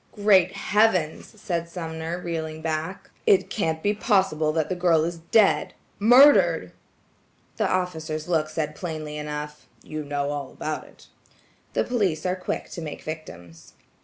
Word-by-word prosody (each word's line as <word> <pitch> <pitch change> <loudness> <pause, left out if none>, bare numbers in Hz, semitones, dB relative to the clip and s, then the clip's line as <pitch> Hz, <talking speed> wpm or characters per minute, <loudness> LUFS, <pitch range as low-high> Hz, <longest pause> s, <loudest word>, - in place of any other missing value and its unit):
"Great 195 -4 +4
heavens!" 205 -2 +1
said 170 -3 -3
Sumner 165 -1 -5
reeling 160 -2 -5
back, 160 +3 -4 0.2
"it 195 - +4
can't 160 -6 -1
be 205 - +2
possible 190 -8 +1
that 160 -1 0
the 185 - -2
girl 175 -3 +3
is 170 0 -3
dead–murdered!" 225 - +4 0.9
The 215 -4 +1
officer's 160 -4 -2
look 160 -3 +1
said 155 -1 -3
plainly 155 -2 -5
enough,–"you 150 +1 -7
know 145 0 -2
all 145 -2 -5
about 155 0 -4
it." - - -18 0.7
The - - +2
police 195 -11 -1
are 180 0 +1
quick 185 - -4
to 170 - -6
make 155 -2 -7
victims. 90 - -9
160 Hz, 135 wpm, -25 LUFS, 155-185 Hz, 0.9 s, Great